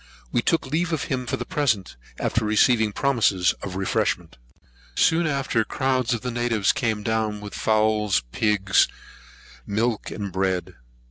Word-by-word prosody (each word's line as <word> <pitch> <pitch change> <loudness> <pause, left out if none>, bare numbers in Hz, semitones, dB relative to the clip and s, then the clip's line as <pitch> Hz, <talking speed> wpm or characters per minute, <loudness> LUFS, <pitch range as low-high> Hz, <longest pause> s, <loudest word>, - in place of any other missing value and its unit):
We - - +2
took 165 +6 +1
leave 165 +5 -1
of 160 -3 -1
him 125 -1 -3
for - - -1
the - - -5
present, 115 - 0 0.2
after 115 - 0
receiving 110 +1 +3
promises 110 -8 +2
of 95 -2 -6
refreshment. 95 0 -1 0.6
Soon 165 0 +3
after, 135 -6 0
crowds 130 0 0
of 120 -3 0
the 125 - -3
natives 115 -4 +1
came 110 -3 -1
down 110 -2 -1
with 105 0 -9
fowls, 110 - +2
pigs, 100 - +3 0.8
milk, 110 +2 -1
and 100 -2 -5
bread. 95 -1 0
Mr. - - -16
110 Hz, 150 wpm, -24 LUFS, 105-125 Hz, 0.8 s, receiving